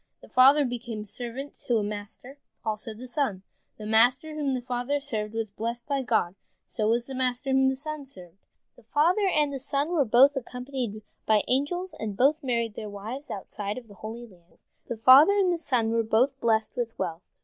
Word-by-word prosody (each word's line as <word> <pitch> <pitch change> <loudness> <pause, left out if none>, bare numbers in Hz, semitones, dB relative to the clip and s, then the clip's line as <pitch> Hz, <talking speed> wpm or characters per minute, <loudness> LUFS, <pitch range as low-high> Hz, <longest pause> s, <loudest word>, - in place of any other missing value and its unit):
The - - -14
father 275 +3 +6
became 240 -3 -5
a - - -8
servant 245 +6 -7
to 240 -3 +3
a 215 - 0
master, 210 +6 -7 0.3
also 220 +1 -3
the 245 +4 -9
son. 235 -8 -2 0.3
The 215 - -8
master 245 +8 +3
whom 290 -3 -1
the 250 - -3
father 250 +3 -1
served 220 -6 -4
was 225 -2 -3
blessed 235 +3 -4
by 280 -2 -1
God, 220 -8 +1 0.3
so 215 - -2
was 235 +2 +1
the 270 - -8
master 255 +1 -1
whom 265 0 +4
the 265 - -1
son 305 +1 -6
served. 185 -8 -14 0.4
The - - -18
father 330 - +2
and 300 -5 +2
the 270 - -4
son 280 +3 -1
were 340 -5 +2
both 265 +5 +5
accompanied 250 -4 -5 0.2
by 215 -1 +4
angels, 350 +8 -1
and 210 -3 -4
both 290 +6 +3
married 235 -4 -1
their 210 0 -6
wives 220 +8 -7
outside 205 +1 -5
of 245 -2 -9
the 205 - -14
Holy 220 +4 -8
Land. 180 -6 -22 0.2
The 235 - -4
father 265 - +8
and 380 -3 +3
the 340 - -3
son 245 -8 0
were 230 0 +2
both 245 +5 +1
blessed 220 -2 +1
with 235 -2 -3
wealth. 170 -3 -3
245 Hz, 205 wpm, -27 LUFS, 220-275 Hz, 0.4 s, father